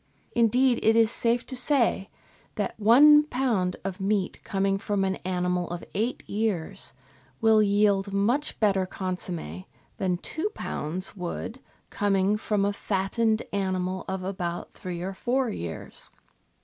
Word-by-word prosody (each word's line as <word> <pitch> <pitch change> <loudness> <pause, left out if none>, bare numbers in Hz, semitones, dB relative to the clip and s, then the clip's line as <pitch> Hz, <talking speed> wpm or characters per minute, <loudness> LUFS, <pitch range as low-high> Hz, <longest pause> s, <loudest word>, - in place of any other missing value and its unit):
Indeed, 240 +2 +3
it 220 +1 +4
is 225 -1 +4
safe 235 +1 +1
to 260 - -5
say 245 -6 +2 0.5
that - - -2
one 290 +8 +8
lb. 235 -10 0
of 195 -1 -4
meat 195 -1 -1
coming 195 0 0
from 205 -2 -1
an 190 0 0
animal 180 -1 -1
of 175 0 -5
eight 225 +5 -2
years 200 -3 -2 0.4
will 220 -1 +5
yield 200 -1 +2
much 235 +10 0
better 195 -3 +2
consomm^ 180 - -5 0.3
than 180 -2 0
two 320 - -3
lbs. 180 +7 -4
would, 190 +7 -5 0.3
coming 200 0 +2
from 210 -1 0
a 205 - +1
fattened 215 +3 0
animal 185 -1 -1
of 190 -1 -3
about 180 -2 -4
three 175 -1 -6
or 190 +1 -3
four 250 +4 0
years. 85 - -5
200 Hz, 135 wpm, -27 LUFS, 185-225 Hz, 0.5 s, one